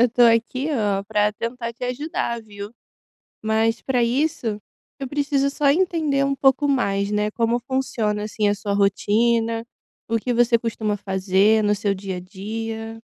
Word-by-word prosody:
Eu 245 - +5
tô 245 +1 +2
aqui, 235 +4 +3
oh, 205 -6 0
pra 210 0 +1
tentar 230 +2 -4
te 245 +2 -7
ajudar, 250 -2 -2
viu. 205 0 -9 0.7
Mas 220 +1 +1
pra 250 -3 +1
isso, 240 -4 0 0.4
eu 270 - -4
preciso 280 0 0
só 285 0 +1
entender 315 -4 +2
um 275 0 0
pouco 270 +2 +3
mais, 200 -7 +1
né. 210 0 0
Como 230 +2 +1
funciona, 235 -5 -1
assim, 215 0 -1
a 205 - +3
sua 200 0 -3
rotina, 225 +3 +1 0.4
o 230 0 +1
que 245 +3 -2
você 240 0 +4
costuma 220 -2 -2
fazer 195 +2 +2
no 210 0 +3
seu 205 0 0
dia 190 -1 -5
a - - -4
dia? 225 +4 -6
225 Hz, 165 wpm, -22 LUFS, 210-255 Hz, 0.7 s, Eu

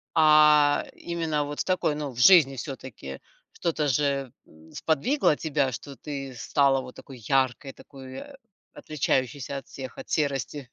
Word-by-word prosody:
А 150 -2 +5
именно 165 -3 -2
вот 145 0 -7
в - - 0
такой, 185 -5 0
ну, 145 -2 -4
в 120 - -10
жизни 150 -4 +7
всё-таки 120 - -8 0.3
что-то 155 -3 -2
же, 140 -1 0 0.2
м, 80 +1 -19
сподвигло 160 - +1
тебя, 145 -4 -1
что 140 +4 -8
ты 135 0 -7
стала 135 +2 +2
вот 125 -1 -11
такой 135 -2 -12
яркой, 130 +3 0
такой 130 -1 -11 0.5
отличающейся 140 -2 -2
от 135 - -8
всех, 130 -2 -9
от - - -10
серости. 145 -1 -1
140 Hz, 145 wpm, -26 LUFS, 130-150 Hz, 0.5 s, жизни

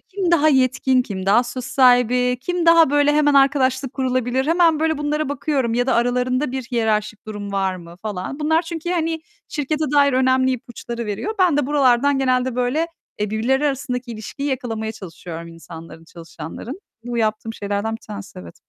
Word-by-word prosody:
kim 380 -3 -3
daha 310 -3 +4
yetkin, 260 -2 +3
kim 190 -4 -6
daha 215 +5 +5
söz 250 +1 -6
sahibi, 250 -1 +3
kim 355 +4 -2
daha 330 -3 +6
böyle 290 0 +3
hemen 295 -1 +3
arkadaşlık 270 -1 +2
kurulabilir, 255 0 -1
hemen 330 -2 +3
böyle 315 -1 +1
bunlara 295 0 -1
bakıyorum 270 -4 -1
ya 245 +1 +1
da 260 - +2
aralarında 250 +3 0
bir 265 - -3
hiyerarşik 220 -3 -1
durum 205 -2 -6
var 190 -1 0
mı 170 -1 -12
falan, 210 +6 -5
bunlar 320 +2 +2
çünkü 335 0 -5
hani 325 -2 -1 0.3
şirkete 305 +1 -2
dair 280 -1 +4
önemli 260 0 +3
ipuçları 235 -1 -6
veriyor. 210 - -3
Ben 355 -6 +4
de 290 - +1
buralardan 280 -1 +3
genelde 255 -1 +1
böyle, 250 +7 0 0.3
eee, 210 -1 -2
birbirleri 260 +7 +1
arasındaki 255 -3 -3
ilişkiyi 230 +6 -5
yakalamaya 225 -4 -3
çalışıyorum 170 -4 -9
insanların, 165 0 -12
çalışanların. 170 - -9 0.2
Bu 240 -1 -3
yaptığım 220 0 -1
şeylerden 205 +1 -2
bir - - -24
tanesi 205 - -9
evet. 85 -2 -11
255 Hz, 170 wpm, -21 LUFS, 220-290 Hz, 0.3 s, daha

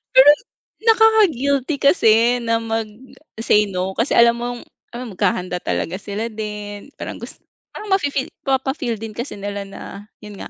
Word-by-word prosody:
Pero 265 +2 +9 0.5
nakaka-guilty 370 - +3
kasi 240 - +4
na 230 -1 +1
mag 225 -1 -2 0.5
say 210 -2 +3
no 185 0 -2
kasi 230 +7 0
alam 235 0 +5
mong 240 0 -4 0.4
alam 240 -2 -6
maghahanda 180 -2 -1
talaga 185 +4 -2
sila 215 +4 -4
din, 210 +1 -6
parang - - -6
gus - - -9 0.3
parang 420 -1 -9
mafe-feel, 285 -8 0 0.2
mapa-feel 265 -2 -1
din 220 0 -7
kasi 235 0 -6
nila 200 0 -5
na 195 0 -10 0.4
yun 210 -1 -11
nga, - - -7
230 Hz, 150 wpm, -20 LUFS, 210-270 Hz, 0.5 s, Pero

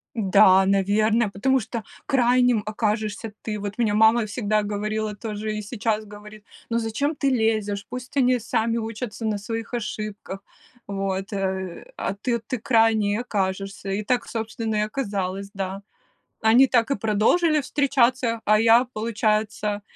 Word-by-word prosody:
Да, 190 -3 +5
наверное, 210 +3 +2
потому 260 +7 +1
что 225 0 -5 0.2
крайним 245 -3 +3
окажешься 215 0 -2
ты. 210 -2 -3
Вот 205 +1 -5
мне 225 -4 +1
мама 220 +2 +4
всегда 215 -1 0
говорила 210 +1 -2
тоже, 215 0 -4
и 215 - -3
сейчас 215 0 -2
говорит: 210 0 -12 0.3
"Ну 230 - +1
зачем 260 +7 -1
ты 280 -1 +1
лезешь?" 215 -4 0
Пусть 250 +2 -7
они 255 -1 +3
сами 225 +1 -1
учатся 225 0 -5
на 215 -1 0
своих 225 +3 -5
ошибках, 210 -3 -5 0.5
вот, 195 0 -3
э, 190 -2 -3
а - - -2
ты 235 +3 -1
ты 230 +3 -4
крайней 225 -3 +3
и 210 - 0
окажешься. 195 -3 -3
И 200 +2 -2
так, 240 +2 0
собственно, 225 -1 -3
и - - +2
оказалось, 200 -5 -3
да. 195 0 -4 0.6
Они 230 +4 +6
так 235 0 +2
и 275 - +1
продолжили 230 - +2
встречаться, 255 -5 +1
а 215 0 +5
я, 230 +3 +5
получается, 215 -1 -1
215 Hz, 145 wpm, -24 LUFS, 205-235 Hz, 0.6 s, Они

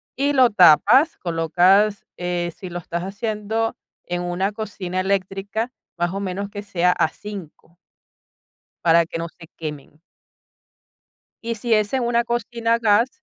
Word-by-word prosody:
y 285 +2 +1
lo 255 -3 +5
tapas, 205 - +6
colocas, 180 +5 +2
eh, 175 -1 -2
si 185 - -8
lo 175 - -5
estás 175 0 -4
haciendo 215 +2 -2 0.3
en 175 0 -3
una 180 +3 -1
cocina 200 -4 -4
eléctrica, 195 +4 -2 0.3
más 175 +1 -1
o 195 - -3
menos 200 +1 -4
que 205 0 -6
sea 180 -3 +2
a - - +2
5. 180 -4 -10 1.1
Para 170 0 +5
que 165 - -6
no 165 0 -3
se 165 -1 -15
quemen. 150 -1 -7 1.4
Y 230 0 -2
si 230 +2 0
es 215 +2 +1
en 260 - +1
una 235 0 +2
cocina 235 -1 -1
a - - -3
gas. 225 +2 +4
195 Hz, 150 wpm, -22 LUFS, 175-225 Hz, 1.4 s, tapas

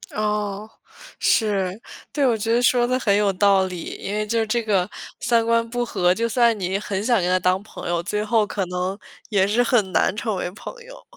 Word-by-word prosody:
哦， 210 0 -2 0.5
是， 200 -4 +2 0.4
对。 285 -1 +1
我 240 -3 +2
觉 225 +2 -1
得 240 - +3
说 245 0 +3
得 255 +1 +1
很 205 -5 +2
有 205 -1 +2
道 195 0 +3
理， 180 -2 -6 0.2
因 200 - -5
为 215 0 -1
就 225 +1 0
这 230 +2 -1
个 200 -3 +1 0.3
三 230 -2 +2
观 230 0 +2
不 245 +1 -1
和， 180 -6 +2
就 230 +2 -1
算 235 -1 +3
你 190 0 -2
很 200 -1 -3
想 235 0 +3
跟 175 - 0
他 185 - +3
当 185 +1 +1
朋 215 - -8
友， 175 -1 0
最 210 +4 -2
后 215 -1 +2
可 195 -2 -2
能 180 +2 -3 0.3
也 200 -3 +3
是 215 +5 +2
很 230 -6 +2
难 185 - +2
成 215 0 -2
为 180 - -3
朋 200 - -9
友。 - - -13
210 Hz, 230 characters per minute, -22 LUFS, 190-230 Hz, 0.5 s, 得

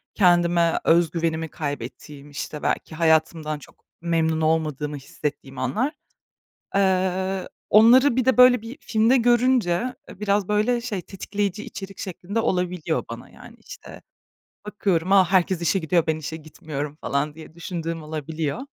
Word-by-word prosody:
kendime 175 -3 +3
öz 165 -1 +4
güvenimi 160 -1 -2
kaybettiğim, 145 -1 -7
işte, 145 +1 -6
belki 160 - -2
hayatımdan 160 -1 +1
çok - - -18 0.2
memnun 160 -1 0
olmadığımı 155 -2 0
hissettiğim 135 -1 -6
anlar. 220 - -1 0.8
Iıı, 190 0 +1 0.2
onları 240 +5 +6
bir 255 - +2
de, 260 - +3
böyle, 250 -2 +7
bir 235 +5 -8
filmde 225 +4 +2
görünce, 240 -4 +3 0.4
ııı, 195 - -13
biraz, 205 -1 +1
böyle, 215 +4 +1
şey, 210 -7 -4
tetikleyici 200 +1 -4
içerik 195 0 -9
şeklinde 195 +4 -4
olabiliyor 180 -5 -1
bana - - -8
yani. - - -14
İşte, - - -12 0.6
bakıyorum, 190 -4 -1
herkes 185 -2 +4
işe 195 - +2
gidiyor, 170 -1 +1
ben 160 -1 +1
işe 155 +1 -6
gitmiyorum 150 -2 -7
falan 145 +2 -1
diye 160 0 -12
düşündüğüm 165 -1 -5
olabiliyor. 155 -1 -4
175 Hz, 135 wpm, -23 LUFS, 155-205 Hz, 0.8 s, böyle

